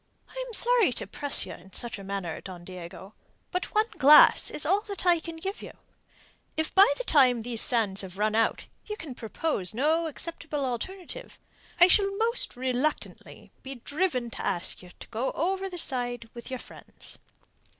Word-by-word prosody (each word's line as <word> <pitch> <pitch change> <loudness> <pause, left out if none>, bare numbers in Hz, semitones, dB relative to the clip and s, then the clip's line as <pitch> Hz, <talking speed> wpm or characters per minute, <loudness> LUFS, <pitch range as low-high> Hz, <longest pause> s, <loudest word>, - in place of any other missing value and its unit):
"I - - -6
am 480 - -9
sorry 475 - +3
to - - -5
press 280 +8 0
you - - -7
in 190 +2 -15
such 235 -3 -2
a - - -9
matter, 195 -4 -4
Don 180 -2 -9
Diego, 185 +2 -10 0.4
but 360 +4 -3
one 430 +1 +4
glass 290 +3 +7
is 295 - -1
all 385 +6 +3
that 400 -2 -4
I 350 -2 +5
can 330 0 -8
give 390 +5 -5
you. - - -9 0.8
If 315 0 -1
by 385 -4 +7
the - - -3
time 255 - +4
those 230 -1 0
sands 210 -5 +2
have 190 -1 -9
run 215 +1 +1
out 225 +1 +1 0.2
you 425 0 -5
can 310 -8 -8
propose 225 - -2
no 315 +6 +2
acceptable 315 -2 -4
alternative, 375 - -6 0.4
I 350 - +9
shall 395 +1 +2
most 465 +2 +3
reluctantly 255 +4 -3
be 270 +1 -8
driven 260 -2 -2
to - - -6
ask 180 -1 -2
you 180 - -13
to - - -10
go 235 +4 -2
over 385 +4 -1
the 360 - -7
side 245 -6 -3
with 235 +1 -9
your 260 - -3
friends." - - -12
270 Hz, 180 wpm, -27 LUFS, 225-360 Hz, 0.8 s, I